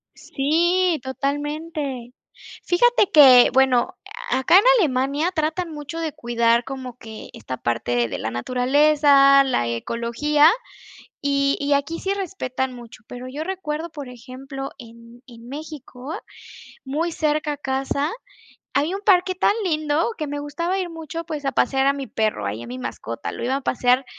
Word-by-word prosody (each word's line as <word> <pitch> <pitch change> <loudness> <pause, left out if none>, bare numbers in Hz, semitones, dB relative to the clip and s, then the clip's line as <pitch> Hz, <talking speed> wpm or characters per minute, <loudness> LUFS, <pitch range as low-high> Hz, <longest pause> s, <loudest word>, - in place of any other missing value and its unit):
Sí, 340 +4 +1
totalmente. 285 -1 -4 0.5
Fíjate 420 +2 +3
que, 260 -6 +8
bueno, 260 -2 +3 0.3
acá 265 +6 +3
en 405 - +6 0.2
Alemania, 285 +2 +1
tratan 325 +1 -2
mucho 295 +2 -7
de 320 -3 -3
cuidar 235 -1 +1
como 260 -3 -7
que 220 -3 -10
esta 130 - -7
parte 120 0 -1
de - - -5
la 110 - -3
naturaleza, 275 - +4
la 185 - 0
ecología, 235 - +2 0.7
y 280 -1 +1
y 285 0 -2
aquí 285 +4 -1
sí 390 - -1
respetan 265 -10 -3
mucho, 235 -2 -12
pero 250 +1 -8
yo 295 +4 -5
recuerdo, 335 -4 -4
por 285 -5 -8
ejemplo, 270 +2 -8
en 235 0 -14
en 235 -1 -14
México, 285 -1 -8 0.7
muy 315 +6 -2
cerca 305 -1 -1
a 290 - -7
casa, 275 +2 -2 0.6
hay 300 +6 +1
un 395 - -4
parque 370 -2 +3
tan 370 - +2
lindo 310 +4 0
que 305 - -4
me 290 0 -4
gustaba 335 +6 -2
ir 370 -2 -2
mucho, 325 0 -6
pues, 305 -3 -6
a 275 - 0
pasear 270 +2 +1
a - - +4
mi 275 -1 -6
perro, 215 - -1
ahí 105 +3 -4
a - - -9
mi 125 - -6
mascota, 115 -1 -6
lo - - -6
iba 260 +3 0
a - - -3
pasear 250 +1 +2
280 Hz, 155 wpm, -22 LUFS, 250-315 Hz, 0.7 s, que